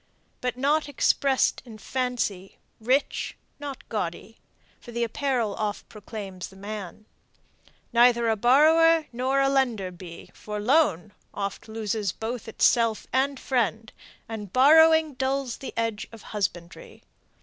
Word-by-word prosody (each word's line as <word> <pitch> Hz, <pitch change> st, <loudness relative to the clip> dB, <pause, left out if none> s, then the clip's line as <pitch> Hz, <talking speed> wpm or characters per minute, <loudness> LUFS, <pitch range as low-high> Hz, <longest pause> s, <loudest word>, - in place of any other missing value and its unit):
But 250 Hz, -1 st, -2 dB
not 290 Hz, +3 st, +1 dB
express'd 275 Hz, -1 st, +2 dB
in 230 Hz, -4 st, -12 dB
fancy; 230 Hz, -6 st, -3 dB, 0.2 s
rich, 255 Hz, +6 st, 0 dB, 0.2 s
not 285 Hz, -2 st, -8 dB
gaudy; 205 Hz, +1 st, -5 dB, 0.4 s
For 240 Hz, -, -12 dB
the 235 Hz, 0 st, -1 dB
apparel 235 Hz, -3 st, -1 dB
oft 210 Hz, -1 st, -4 dB
proclaims 200 Hz, -3 st, -8 dB
the 195 Hz, -, -17 dB
man. 205 Hz, 0 st, -8 dB, 0.9 s
Neither 235 Hz, 0 st, +5 dB
a 225 Hz, -, +2 dB
borrower 315 Hz, +8 st, +5 dB
nor 260 Hz, +3 st, 0 dB
a 275 Hz, -, +3 dB
lender 245 Hz, -9 st, 0 dB
be: 175 Hz, -1 st, -11 dB
For 210 Hz, 0 st, -6 dB
loan 210 Hz, -, +2 dB, 0.2 s
oft 200 Hz, +1 st, -4 dB
loses 215 Hz, -3 st, -2 dB
both 230 Hz, +1 st, -5 dB
itself 230 Hz, 0 st, +2 dB
and 270 Hz, +1 st, +1 dB
friend, 225 Hz, -3 st, -1 dB, 0.3 s
And 210 Hz, -4 st, -7 dB
borrowing 320 Hz, +4 st, +6 dB
dulls 265 Hz, -1 st, -2 dB
the 270 Hz, -, -7 dB
edge 225 Hz, -2 st, -2 dB
of 225 Hz, -2 st, -13 dB
husbandry. 175 Hz, -5 st, -5 dB
235 Hz, 125 wpm, -26 LUFS, 210-270 Hz, 0.9 s, borrowing